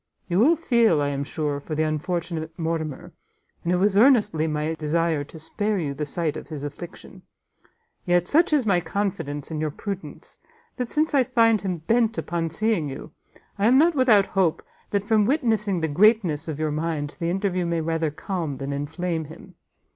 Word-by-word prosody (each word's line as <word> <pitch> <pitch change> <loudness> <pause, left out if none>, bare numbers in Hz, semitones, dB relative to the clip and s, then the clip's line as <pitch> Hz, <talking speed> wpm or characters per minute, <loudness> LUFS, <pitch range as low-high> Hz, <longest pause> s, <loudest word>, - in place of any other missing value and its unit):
You 180 0 +1
will 300 +10 +5
feel, 235 - +3
I 145 0 +1
am 140 0 -2
sure, 145 -1 -2
for 155 +2 -5
the 155 - +1
unfortunate 160 +1 -3
Mortimer, 160 -4 -3 0.5
and 170 - 0
it - - +3
was 195 +2 +2
earnestly 210 - +4
my 155 +1 -1
desire 160 -1 0
to 160 - -13
spare 205 +7 -2
you 150 -6 -2
the 145 +2 -4
sight 160 0 -2
of - - -7
his 150 -3 -6
affliction; 165 +5 -9 0.8
yet 175 0 +2
such 335 +4 +3
is 290 -5 +3
my 195 -4 +3
confidence 165 -5 -3
in 155 -1 -3
your 155 - 0
prudence, 195 +5 -7 0.4
that 250 -2 -2
since 310 +1 +1
I 275 - +5
find 230 -4 +3
him 185 -2 -2
bent 230 +1 +2
upon 170 -1 -2
seeing 175 -3 0
you, 135 +3 -8 0.5
I 205 - +3
am 255 +3 +6
not 330 +4 +5
without 240 -8 +4
hope, 185 -5 +1 0.3
that 200 -1 0
from 215 -1 +2
witnessing 220 - +1
the 160 - +1
greatness 175 -2 +3
of 155 -3 -4
your 155 -1 0
mind, 150 -1 -3
the 170 -1 -1
interview 185 -1 -1
may 170 -1 0
rather 165 0 0
calm 155 -2 -4
than 135 +1 -4
inflame 160 +3 -3
him. 155 +2 -13
170 Hz, 185 wpm, -24 LUFS, 155-210 Hz, 0.8 s, am